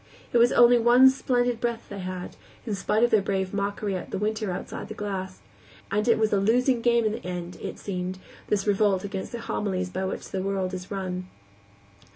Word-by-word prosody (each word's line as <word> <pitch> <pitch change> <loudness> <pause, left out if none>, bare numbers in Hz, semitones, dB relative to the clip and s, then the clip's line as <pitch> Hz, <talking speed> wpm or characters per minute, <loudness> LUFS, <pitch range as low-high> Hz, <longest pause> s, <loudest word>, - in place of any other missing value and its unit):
It 240 - +5
was 240 +1 +5
only 240 0 +6
one 245 +3 +7
splendid 245 -3 0
breath 235 -1 -2
they 200 - -6
had, 185 -1 -6 0.3
in 220 - -2
spite 210 +3 +1
of 240 - +3
their 215 - +5
brave 190 -1 -2
mockery 200 0 -2
at 180 - -5
the - - -3
winter 215 +1 -1
outside 180 - -6
the 215 - -7
glass; 190 -3 -5 0.5
and 210 +2 0
it 230 - +5
was 220 -1 +1
a 200 - +4
losing 245 +4 +2
game 235 -1 +3
in 215 - +2
the 220 - -6
end, 180 -1 -5
it - - -5
seemed, 185 -1 -4 0.3
this 200 -2 0
revolt 200 -2 +2
against 195 -1 -5
the 235 - -5
homilies 185 -5 -2
by 190 +1 -3
which 190 - -5
the 190 - -3
world 190 -1 -2
is 185 0 -6
run. 185 -2 -4
200 Hz, 205 wpm, -26 LUFS, 190-230 Hz, 0.5 s, one